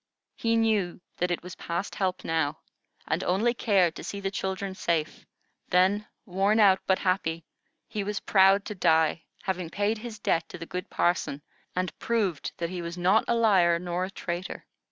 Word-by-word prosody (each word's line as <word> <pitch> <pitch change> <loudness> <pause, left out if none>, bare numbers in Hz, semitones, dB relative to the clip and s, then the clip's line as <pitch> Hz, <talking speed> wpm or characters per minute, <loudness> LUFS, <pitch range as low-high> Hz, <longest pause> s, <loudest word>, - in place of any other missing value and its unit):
He 230 0 +1
knew 215 -6 +1 0.2
that 180 - 0
it 175 - -2
was 180 0 -8
past 170 +4 -3
help 185 -2 -1
now, 160 -1 0 0.5
and - - 0
only 215 +7 +2
cared 195 -8 +2
to - - -7
see 200 - -5
the 195 -1 -2
children 190 0 -3
safe; 170 -5 -2 0.4
then, 190 +4 +3 0.2
worn 195 +3 +2
out 195 -3 +6
but 190 - +4
happy, 170 -4 -1 0.4
he 215 -3 -3
was 205 0 -2
proud 195 0 +4
to - - -4
die, 160 -3 +2 0.2
having 185 -3 -2
paid 205 +4 0
his 225 -1 -7
debt 170 -5 0
to - - -8
the 165 - -7
good 180 +2 -5
parson, 160 -5 0 0.3
and 185 0 -1
proved 210 -8 -1
that 170 0 -3
he 180 -1 -4
was 170 +1 -6
not 185 +5 +3
a 235 - +2
liar 190 -7 +4
nor 175 +1 -2
a - - -7
traitor. 175 -2 -5
185 Hz, 180 wpm, -27 LUFS, 170-205 Hz, 0.5 s, out